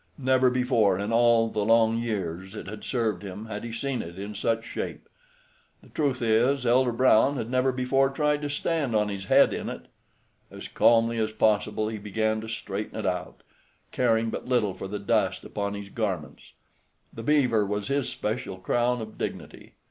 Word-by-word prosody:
Never 130 -1 +3
before 125 -6 +2
in 100 +3 -2
all 115 -1 +4
the 105 -1 -1
long 115 +1 +3
years 95 -5 -4
it - - -7
had 105 +2 -8
served 110 -7 -1
him 100 +2 -7
had 105 -2 -6
he 120 - -5
seen 130 +3 -2
it 85 +2 -9
in 100 +2 -6
such 115 +2 -1
shape. - - -6 0.8
The - - -18
truth 135 -5 -1
is, 120 +4 +2
Elder 125 +1 +3
Brown 130 +3 +4
had 115 -1 -4
never 130 +1 +2
before 135 +2 +1
tried 150 +1 0
to 145 - -3
stand 145 -4 -1
on 105 -1 +2
his 100 -1 -5
head - - +5
in - - -4
it. - - -8 0.6
As - - -9
calmly 115 0 +3
as 110 0 0
possible 110 0 +1
he 110 -1 -4
began 110 +1 -1
to 110 - -8
straighten 105 -2 -5
it 110 - -4
out, 90 -2 -3 0.5
caring 115 -2 +1
but - - -6
little 120 -6 +1
for 95 +1 -7
the 105 +2 -4
dust 100 -2 0
upon 100 0 -4
his 100 -1 -7
garments. 95 -9 -4 0.6
The 115 - -7
beaver 125 -5 +3
was 105 +1 -3
his 140 -1 0
special 105 -3 -4
crown 120 +6 0
of 110 - -11
dignity. - - -6
115 Hz, 185 wpm, -26 LUFS, 105-125 Hz, 0.8 s, head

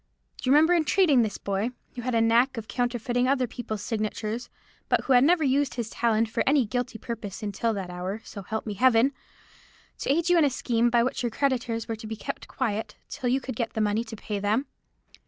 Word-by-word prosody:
Do 255 - -3
you - - +5
remember 320 +4 +6
entreating 325 -4 +4
this 215 -3 -1
boy—who 220 +5 -4
had 250 0 -1
a 225 - +4
knack 235 +3 +3
of 220 -1 -5
counterfeiting 245 +2 0
other 260 -1 +2
people's 215 -3 -5
signatures, 220 +1 -3 0.4
but - - +3
who 270 - +1
had 250 0 +6
never 330 +2 +4
used 280 0 +1
his 230 -2 -4
talent 230 -1 +1
for 220 - -2
any 275 -2 +4
guilty 245 +1 -3
purpose 220 -2 -6
until 210 +2 -1
that 190 -3 -5
hour, 185 +4 -4
so 200 - -8
help 220 +3 -4
me 210 - -3
Heaven!—to 255 +4 -1
aid 330 +4 +1
you 355 -1 +5
in - - +5
a 290 - +4
scheme 240 -2 +1
by 235 0 +3
which 255 - -2
your 240 - 0
creditors 240 -3 -1
were 225 - -2
to 220 - -8
be 220 - -4
kept 275 +6 -6
quiet 220 -4 -3
till 250 - -2
you 260 +2 +2
could 260 -3 -6
get 230 -1 -2
the - - -3
money 215 +2 +1
to 225 -1 -8
pay 210 -1 -4
them? 215 +7 +1
235 Hz, 215 wpm, -26 LUFS, 220-260 Hz, 0.4 s, remember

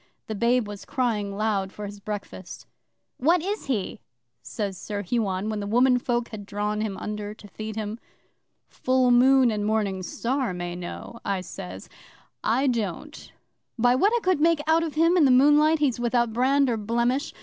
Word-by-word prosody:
The 220 - -5
babe 235 +2 +1
was 205 -1 -8
crying 220 -7 -2
loud 205 -3 0
for 210 - -7
his 205 0 -8
breakfast. 200 -3 -7 0.5
'"What 330 +5 +2
is 405 -1 -3
he?" 220 -8 -2 0.4
says 200 -3 -4
Sir 205 +2 -5
Huon, 200 -2 -1
when 215 -1 -2
the 200 - -4
womenfolk 245 +1 +2
had 215 -3 -7
drawn 210 +1 -2
him 205 -3 -3
under 210 0 -5
to 215 -1 -14
feed 215 +2 -7
him. 215 +1 -4 0.7
'"Full 255 -1 +1
Moon 255 0 +5
and 210 -1 -2
Morning 205 -3 0
Star 240 +3 -2
may 175 0 -4
know," 180 +6 -8
I 195 -2 -1
says. 95 - -8 0.6
"I 245 +6 +2
don't. 240 - -3 0.5
By 245 +1 +4
what 385 +12 +3
I 475 - 0
could 370 -4 +2
make 330 -1 +3
out 320 +1 +3
of 320 -3 -4
him 330 +3 +4
in 320 - +5
the - - +4
moonlight, 295 +5 +5
he's 275 -5 0
without 240 -1 +1
brand 270 +4 +3
or 235 -2 0
blemish. 235 +6 0
230 Hz, 175 wpm, -25 LUFS, 205-260 Hz, 0.7 s, Moon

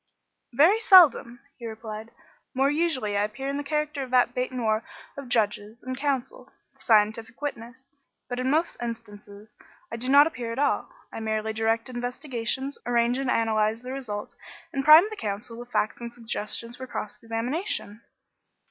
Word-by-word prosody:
"Very 335 - +5
seldom," 315 - +6 0.2
he 235 - -6
replied. 220 0 -7 0.5
"More 270 +2 +3
usually 295 -10 0
I 200 - +2
appear 240 +6 -4
in 280 - -2
the 290 - -3
character 300 0 -2
of 260 - -5
that 250 -1 +3
bête 250 0 -1
noir 225 -3 0 0.3
of 275 -3 -8
judges 215 0 -1
and 255 0 -4
counsel 275 - -3 0.2
the - - -33
scientific 220 +1 +2
witness. 260 -2 -7 0.4
But 245 0 -4
in 255 +1 0
most 320 +4 +1
instances 210 -3 -8 0.4
I - - -4
do 250 +3 -2
not 285 +2 +8
appear 245 -7 -4
at 230 - -5
all; 285 +1 +1 0.2
I - - -5
merely 220 0 -2
direct 225 +1 0
investigations, 250 +1 -3
arrange 240 +1 +1
and 270 -2 -1
analyse 220 -1 +1
the 255 - -6
results, 230 -7 -5 0.4
and 270 - -1
prime 310 +5 +9
the - - -5
counsel 215 - -5
with 240 0 -9
facts 215 - -1
and 235 0 -6
suggestions 230 0 -5
for 260 - -7
cross 210 -4 -6
examination." 230 - -3
240 Hz, 165 wpm, -26 LUFS, 220-275 Hz, 0.5 s, prime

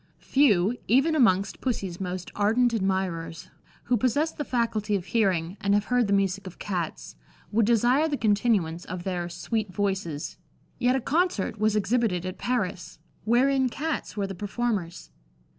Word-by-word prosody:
Few, 225 -6 +3
even 270 +8 +4
amongst 200 -10 +2
Pussy's 195 -8 -3
most 180 -1 -4
ardent 230 +4 +2
admirers, 190 -5 -2 0.3
who 245 0 +1
possess 285 +8 +1
the 295 - -5
faculty 225 -5 0
of 185 -3 -3
hearing, 190 -5 0
and 200 0 +2
have 205 0 +1
heard 245 -3 +3
the - - -2
music 195 0 +1
of 185 - -10
Cats, 160 - -4 0.4
would 215 0 +2
desire 245 +6 +3
the 290 -2 -1
continuance 205 -7 +1
of 180 0 -6
their 175 -2 -3
"sweet 185 +5 -3
voices"; 180 -6 -2 0.4
yet 250 +1 +3
a 265 - 0
concert 275 - 0
was 215 0 +2
exhibited 210 -4 +1
at 185 - -5
Paris, 195 -9 -2 0.3
wherein 260 +3 +3
Cats 305 -2 -4
were 200 - 0
the 195 - -5
performers. 200 - -3
205 Hz, 155 wpm, -26 LUFS, 185-240 Hz, 0.4 s, even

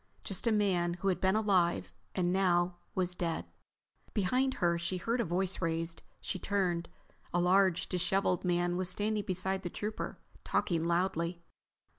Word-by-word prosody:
Just 195 +4 -1
a - - +4
man 185 -5 +2
who 195 +2 0
had 185 - 0
been 190 +1 +3
alive 190 -5 +2 0.2
and 180 -1 +1
now 175 -2 +2 0.2
was 180 -1 0
dead. 170 -2 -2 0.7
Behind 255 +7 +2
her 170 -1 +1
she 170 +2 -1
heard 230 +7 0
a - - +1
voice 185 +2 -1
raised. 165 -1 -1 0.2
She 185 - -3
turned. 180 -4 0 0.4
A 175 - +1
large, 185 0 +3
disheveled 180 0 +1
man 175 -1 +1
was 185 -1 +2
standing 210 +2 0
beside 190 +1 -1
the 175 - -4
Trooper, 210 +4 -4 0.3
talking 165 -3 0
loudly. 170 0 0
180 Hz, 155 wpm, -32 LUFS, 175-195 Hz, 0.7 s, a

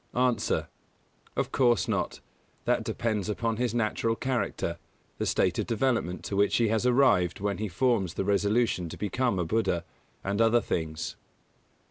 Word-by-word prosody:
_ 125 -3 +1
A. - - 0 0.7
Of - - -1
course 120 -5 +3
not: - - -2 0.4
that - - +2
depends 110 -3 -2
upon 115 +1 -1
his 120 -1 -1
natural 115 0 0
character, 130 +1 -2 0.4
the - - 0
state - - +1
of - - -1
development 115 -6 0
to 100 - -4
which 100 0 +3
he 115 -2 +2
has 110 +3 +1
arrived 120 - +3
when 100 -1 -2
he 110 - -1
forms 100 -2 +1
the 95 - -1
resolution 100 -2 +1
to - - -8
become 105 +2 0
a 90 - 0
Buddha, 95 -3 0 0.4
and 100 +3 0
other 115 +1 +5
things. 80 -5 -3
110 Hz, 160 wpm, -28 LUFS, 95-120 Hz, 0.7 s, other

